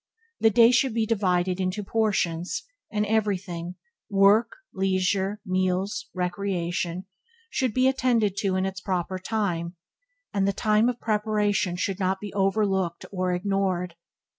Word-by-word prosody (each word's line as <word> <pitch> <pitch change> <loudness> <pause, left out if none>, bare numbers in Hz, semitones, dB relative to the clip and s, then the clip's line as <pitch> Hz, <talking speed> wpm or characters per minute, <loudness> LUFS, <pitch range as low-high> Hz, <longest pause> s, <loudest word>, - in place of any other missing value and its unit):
The 225 - +5
day 230 +2 +6
should 250 -1 +2
be 225 -1 +2
divided 185 -4 +1
into 185 +3 -1
portions, 195 -6 0 0.3
and 210 -1 0
everything 195 -5 -1 0.2
– - - -66
work, 200 - +4 0.2
leisure, 190 +1 0
meals, 185 +3 -1
recreation 180 -1 -2 0.2
– 465 0 -34
should 255 -3 0
be 255 +4 +3
attend 255 -3 +2
to 195 -2 0
in 185 0 +1
its 190 0 -4
proper 185 0 -2
time; 185 -4 -2 0.6
and 195 -1 +1
the 200 - +1
time 215 +3 +2
of 245 -1 -4
preparation 210 -4 0
should 185 +1 -2
not 190 0 0
be 205 0 -7
overlooked 195 -3 0
or 185 -2 -1
ignored. 185 -2 -1
195 Hz, 140 wpm, -26 LUFS, 185-215 Hz, 0.6 s, day